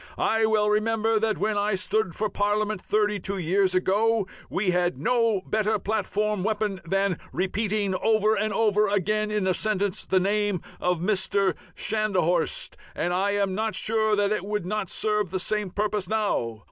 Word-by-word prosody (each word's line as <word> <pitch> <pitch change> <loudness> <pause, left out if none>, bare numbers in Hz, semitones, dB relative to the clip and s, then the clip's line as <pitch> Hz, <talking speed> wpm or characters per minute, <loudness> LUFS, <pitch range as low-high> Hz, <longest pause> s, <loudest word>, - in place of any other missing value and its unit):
I 225 0 +2
well 215 -1 +2
remember 220 +1 +1
that 220 0 0
when 210 0 0
I 205 0 +1
stood 190 -1 0
for 215 - 0
Parliament 205 0 -1
thirty 210 -1 0
two 195 +2 -3
years 185 +2 +1
ago 210 +3 +2 0.2
we 190 -1 0
had 180 0 0
no 230 -4 +1
better 215 0 +1
platform 210 -1 -1
weapon 210 -3 -1
than 195 +1 0
repeating 200 +2 -1
over 215 +2 +2
and 215 0 0
over 210 0 +2
again 210 +2 0
in 210 -2 -1
a 185 - +2
sentence 205 0 -1
the 190 - +3
name 205 0 0 0.2
of 180 0 +1
Mr. 195 +1 +1 0.2
Schnadhorst, 215 - 0 0.2
and 175 - -1
I 195 +3 +1
am 200 -2 0
not 220 +2 -1
sure 220 -1 +1
that 205 0 +1
it 215 - -1
would 210 -2 -3
not 200 -1 -2
serve 210 -3 0
the 190 - -2
same 210 +1 -1
purpose 205 -1 -1
now. 205 - -1
210 Hz, 170 wpm, -25 LUFS, 190-215 Hz, 0.2 s, the